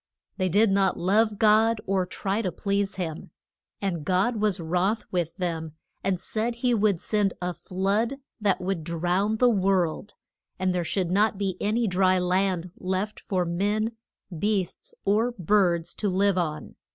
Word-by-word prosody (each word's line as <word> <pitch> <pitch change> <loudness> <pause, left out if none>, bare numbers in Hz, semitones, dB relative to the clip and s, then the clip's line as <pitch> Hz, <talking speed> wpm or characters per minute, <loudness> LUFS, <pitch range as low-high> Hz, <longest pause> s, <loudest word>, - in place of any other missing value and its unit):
They 185 -2 0
did 205 +4 +4
not 195 -1 +2
love 210 +4 +2
God, 220 +1 +4
or 190 -1 0
try 195 +3 -2
to 185 -5 -2
please 200 0 -1
him. 165 -4 -5 0.5
And 180 -6 -2
God 190 +8 +1
was 210 -3 +1
wroth 180 +6 0
with 170 -3 -1
them, 165 -4 -3 0.3
and 190 -2 0
said 225 +5 -2
he 245 +1 +1
would 210 -5 +2
send 205 -1 0
a 180 0 -2
flood 200 - -1 0.2
that 205 -3 +1
would 180 -3 -2
drown 180 +6 0
the 250 - +4
world, 195 -3 +1 0.4
and 185 -1 0
there 180 -1 0
should 175 +1 -1
not 210 +2 +2
be 195 -2 -1
any 225 +3 +1
dry 185 -1 +3
land 180 -1 0
left 190 +3 -2
for 185 -3 -1
men, 205 +6 0 0.4
beasts, 195 0 -2
or 220 +5 +2
birds 175 -4 +1
to 205 - 0
live 195 +1 +2
on. 155 -4 -3
195 Hz, 160 wpm, -26 LUFS, 180-210 Hz, 0.5 s, did